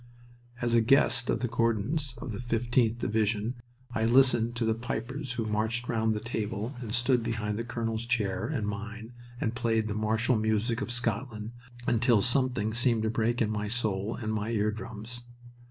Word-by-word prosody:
As 120 Hz, -1 st, +1 dB
a 115 Hz, -, +6 dB
guest 130 Hz, 0 st, +4 dB
of -, -, +1 dB
the 125 Hz, -, +1 dB
Gordons, 120 Hz, +4 st, 0 dB
of 120 Hz, -, -6 dB
the 105 Hz, -, -5 dB
15th 120 Hz, -1 st, +1 dB
Division, 110 Hz, 0 st, 0 dB, 0.4 s
I 110 Hz, -, 0 dB
listened 120 Hz, -1 st, +4 dB
to 115 Hz, -1 st, 0 dB
the 110 Hz, -, +3 dB
pipers 125 Hz, +4 st, -4 dB
who 115 Hz, -3 st, -2 dB
marched 110 Hz, +3 st, -1 dB
round 110 Hz, -2 st, +1 dB
the -, -, -1 dB
table 110 Hz, +1 st, -3 dB
and 115 Hz, -4 st, -5 dB
stood 125 Hz, +1 st, +2 dB
behind 110 Hz, -2 st, -2 dB
the -, -, -1 dB
colonel's 115 Hz, -1 st, -3 dB
chair 105 Hz, -4 st, 0 dB
and 125 Hz, -9 st, -2 dB
mine, 110 Hz, +3 st, -6 dB, 0.3 s
and 110 Hz, -, -1 dB
played 115 Hz, -2 st, +1 dB
the 105 Hz, -, -2 dB
martial 110 Hz, +3 st, +1 dB
music 110 Hz, +3 st, 0 dB
of 135 Hz, -, -3 dB
Scotland, 115 Hz, -2 st, -2 dB, 0.3 s
until 120 Hz, -1 st, +4 dB
something 125 Hz, -2 st, +1 dB
seemed 120 Hz, -2 st, +2 dB
to 110 Hz, -, +1 dB
break 115 Hz, +1 st, +1 dB
in 105 Hz, -, -1 dB
my 105 Hz, -1 st, -2 dB
soul 110 Hz, -2 st, -1 dB
and 110 Hz, -2 st, -3 dB
my 105 Hz, 0 st, -2 dB
ear 105 Hz, -2 st, +1 dB
drums. 115 Hz, +2 st, -5 dB
115 Hz, 180 wpm, -29 LUFS, 110-120 Hz, 0.4 s, a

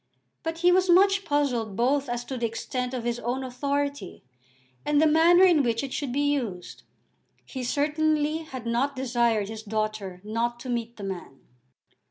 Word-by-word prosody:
But 325 Hz, 0 st, -4 dB
he 355 Hz, 0 st, +5 dB
was 370 Hz, 0 st, +3 dB
much 390 Hz, +3 st, +5 dB
puzzled 250 Hz, -8 st, 0 dB
both 270 Hz, +4 st, +1 dB
as 240 Hz, 0 st, -3 dB
to 265 Hz, -, -5 dB
the 240 Hz, -2 st, -1 dB
extent 250 Hz, +3 st, -4 dB
of 245 Hz, -, -4 dB
his 240 Hz, 0 st, -2 dB
own 245 Hz, +3 st, -2 dB
authority 280 Hz, -3 st, -3 dB, 0.6 s
and 295 Hz, -1 st, +2 dB
the 315 Hz, -, +5 dB
manner 330 Hz, +4 st, +6 dB
in 345 Hz, -5 st, +6 dB
which 235 Hz, -1 st, 0 dB
it 270 Hz, -, -5 dB
should 280 Hz, -4 st, -3 dB
be 285 Hz, +2 st, +1 dB
used. 205 Hz, -11 st, -4 dB, 0.6 s
He 260 Hz, -2 st, -6 dB
certainly 300 Hz, +3 st, +1 dB
had 265 Hz, -7 st, -8 dB
not 250 Hz, +5 st, 0 dB
desired 235 Hz, -5 st, +1 dB
his 220 Hz, 0 st, -7 dB
daughter 215 Hz, -3 st, -3 dB
not 230 Hz, +3 st, -2 dB
to 260 Hz, -, -7 dB
meet 235 Hz, -1 st, -3 dB
the 205 Hz, -, -8 dB
man. 180 Hz, -8 st, -7 dB
255 Hz, 175 wpm, -26 LUFS, 230-290 Hz, 0.6 s, manner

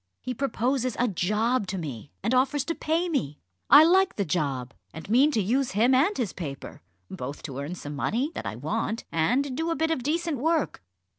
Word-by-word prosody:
He 255 Hz, -, -4 dB
proposes 255 Hz, -1 st, -1 dB
a 245 Hz, -, +2 dB
job 210 Hz, +4 st, 0 dB
to 190 Hz, -, -3 dB
me, 140 Hz, -, -6 dB
and 230 Hz, -, +1 dB
offers 260 Hz, +2 st, +2 dB
to 335 Hz, -, -1 dB
pay 330 Hz, +2 st, 0 dB
me. 150 Hz, -, -2 dB, 0.3 s
I 290 Hz, +2 st, +10 dB
like 375 Hz, +3 st, +4 dB
the 200 Hz, -, -1 dB
job, 140 Hz, -6 st, -2 dB, 0.2 s
and 160 Hz, -, -8 dB
mean 265 Hz, +6 st, +5 dB
to 280 Hz, -, 0 dB
use 250 Hz, +5 st, 0 dB
him 230 Hz, +6 st, +3 dB
and 305 Hz, +11 st, +3 dB
his 225 Hz, -8 st, -2 dB
paper, 140 Hz, -6 st, -7 dB, 0.3 s
both 130 Hz, +3 st, -6 dB
to 135 Hz, -4 st, -6 dB
earn 145 Hz, +6 st, -4 dB
some 145 Hz, -4 st, -7 dB
money 230 Hz, -, -1 dB
that -, -, -5 dB
I -, -, -4 dB
want, 155 Hz, -, -3 dB
and 250 Hz, -, +1 dB
do 325 Hz, +4 st, -1 dB
a 330 Hz, -, 0 dB
bit 320 Hz, +3 st, 0 dB
of 320 Hz, -, 0 dB
decent 315 Hz, +1 st, -1 dB
work." 320 Hz, -, 0 dB
245 Hz, 205 wpm, -26 LUFS, -, 0.3 s, I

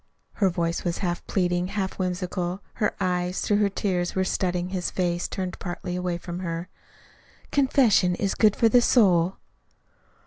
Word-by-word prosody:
Her 195 Hz, -3 st, +2 dB
voice 170 Hz, -1 st, -1 dB
was 175 Hz, -1 st, -1 dB
half 175 Hz, -3 st, -2 dB
pleading, 180 Hz, -2 st, 0 dB
half 195 Hz, -1 st, -3 dB
whimsical. 180 Hz, 0 st, -2 dB
Her 210 Hz, -3 st, -1 dB
eyes, 180 Hz, -1 st, -1 dB
through 205 Hz, -, +2 dB
her 205 Hz, -1 st, +3 dB
tears, 180 Hz, -3 st, -1 dB
were 190 Hz, -, +2 dB
studying 180 Hz, -1 st, -1 dB
his 185 Hz, -2 st, -2 dB
face, 175 Hz, -1 st, -1 dB
turned 185 Hz, -2 st, -4 dB
partly 175 Hz, 0 st, -5 dB
away 180 Hz, -1 st, -2 dB
from 175 Hz, 0 st, -6 dB
her. 170 Hz, 0 st, -4 dB, 0.8 s
"Confession 250 Hz, -10 st, +3 dB
is 195 Hz, +1 st, -1 dB
good 215 Hz, -2 st, +4 dB
for 230 Hz, -, +4 dB
the 245 Hz, +2 st, +5 dB
soul." 185 Hz, -7 st, +3 dB
180 Hz, 160 wpm, -25 LUFS, 175-195 Hz, 0.8 s, the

